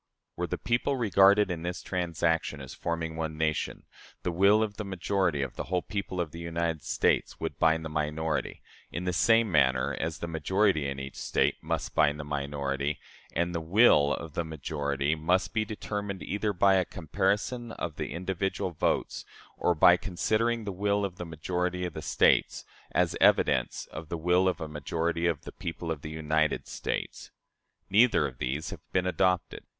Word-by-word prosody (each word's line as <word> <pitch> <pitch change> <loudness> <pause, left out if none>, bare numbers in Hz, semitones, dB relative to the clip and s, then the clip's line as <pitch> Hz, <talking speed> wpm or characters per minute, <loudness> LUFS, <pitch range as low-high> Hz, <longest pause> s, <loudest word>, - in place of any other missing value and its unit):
Were - - -2
the - - -3
people 120 +4 0
regarded 100 -3 +5
in 85 -2 -3
this 90 +1 -4
transaction 85 -4 -1
as 65 -2 -8
forming 80 -1 -3
one 80 -1 -3
nation, 80 -1 -1 0.4
the 90 - 0
will 100 +5 +4
of 105 -2 -4
the 105 - -3
majority 95 -5 0
of 70 - -6
the - - -3
whole 90 -1 -1
people 100 -2 -4
of 85 -3 -2
the 85 - -8
United 85 -2 -2
States - - 0
would - - -4
bind 80 0 +3
the - - -4
minority, 75 +1 -2 0.3
in 85 - -4
the 90 0 -1
same 115 +3 +4
manner 65 -5 +3
as 80 -1 -2
the 85 - -5
majority 85 0 +1
in 70 0 -5
each 70 0 -7
State - - 0
must - - -3
bind 75 -1 +3
the - - -4
minority; 70 0 -2 0.4
and 85 +1 0
the 85 - -2
will 80 -5 +5
of 80 -3 -8
the 85 - -1
majority 70 -2 -2
must 90 +5 0
be 110 -1 +1
determined 105 -2 -4
either 105 +1 -1
by 95 0 +4
a 95 - +3
comparison 100 - -1
of 80 -3 -5
the - - -4
individual 95 +1 -2
votes 75 - -1 0.3
or 90 - +1
by 90 +3 +7
considering 110 +5 0
the 100 - -3
will 100 +2 0
of 90 -2 -6
the 90 - -6
majority 90 +2 -2
of 90 - -5
the 80 - -6
States 75 - +2 0.3
as - - +1
evidence - - +3
of 80 0 -8
the 85 - -2
will 90 +3 +3
of 95 - 0
a 80 - -4
majority 85 +3 -1
of 85 -4 0
the - - -8
people 85 -3 -5
of 75 -3 -4
the 75 - -6
United 80 0 0
States. - - -4 0.6
Neither 115 +4 +5
of - - -11
these 65 +5 -2
has - - -7
been 90 -1 +1
adopted. 90 -1 0
85 Hz, 185 wpm, -29 LUFS, 80-95 Hz, 0.6 s, by